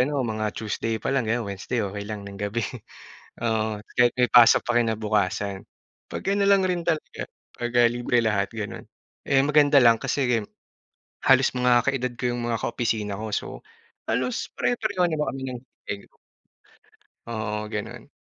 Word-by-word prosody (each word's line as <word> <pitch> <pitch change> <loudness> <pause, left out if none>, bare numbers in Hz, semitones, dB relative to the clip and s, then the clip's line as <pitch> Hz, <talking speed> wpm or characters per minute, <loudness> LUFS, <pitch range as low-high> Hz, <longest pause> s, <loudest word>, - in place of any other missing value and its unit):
ano 140 +1 +1
mga 110 -1 -2
Tuesday 110 +1 -2
pa - - -1
lang, 130 -5 +1
ganiyan, 120 +1 +1
Wednesday 100 +4 -3
okey 100 +1 -5
lang 105 -2 -5
ng 100 -1 -9
gabi. 105 +3 -1 0.8
Oo, 110 -1 0 0.2
kahit 120 -1 +4
may 125 - +5
pasok 120 -2 +8
pa 120 - +1
kinabukasan, 105 -4 0 0.5
'pag - - -5
ano 200 0 +2
lang 195 -1 +5
rin 180 -2 -1
talaga 160 -2 -2 0.3
'pagka 120 0 +2
libre 120 +1 0
lahat, 100 -2 +1
gano'n, 110 -3 -6 0.5
eh, 135 - +4
ang - - -1
maganda 145 -1 +6
lang 115 -3 +5
kasi 140 - 0
game 115 -4 0 0.8
halos 130 0 +6
mga 125 0 +3
kaedad 125 -2 -2
ko - - -6
'yong 120 0 -2
mga 115 -1 0
ka-opisina 110 -4 -1
ko, 110 0 -5
so - - -1 0.6
halos 125 +2 -2
pare-pareho 210 -7 0
naman 150 -2 -1
kami 135 - -6
ng 125 -1 -6 0.3
day 100 0 -4
off. - - -31 1.1
Oo, 110 -2 -3
gano'n. 105 -1 -6
115 Hz, 165 wpm, -25 LUFS, 105-125 Hz, 1.1 s, pasok